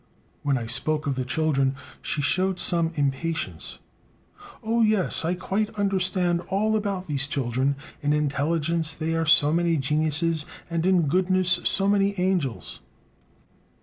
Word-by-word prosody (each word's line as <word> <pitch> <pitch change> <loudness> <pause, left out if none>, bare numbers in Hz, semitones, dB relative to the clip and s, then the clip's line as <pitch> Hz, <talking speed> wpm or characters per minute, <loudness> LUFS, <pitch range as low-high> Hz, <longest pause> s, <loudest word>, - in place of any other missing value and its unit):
When 140 -2 +1
I 120 - -4
spoke 150 +6 0
of 140 -1 -1
the 130 - -2
children, 135 -1 0 0.3
she 145 - -2
showed 185 +4 +1
some 170 -2 +2
impatience: 145 +3 -2 0.9
"Oh, 230 +1 +1
yes, 215 -7 +2
I 170 +3 0
quite 195 +4 -1
understand 185 -3 +1
all 215 +3 +1
about 200 -3 -2
these 140 -3 0
children; 135 0 0 0.3
in 145 -1 0
intelligence 155 +2 0
they 160 0 -2
are 165 0 0
so 150 -1 +5
many 170 -1 +2
geniuses, 155 +3 +1 0.3
and 165 +1 0
in 185 -3 +4
goodness 185 +2 +2
so 195 0 +2
many 200 -1 +2
angels." 180 -10 -1
165 Hz, 140 wpm, -25 LUFS, 145-185 Hz, 0.9 s, so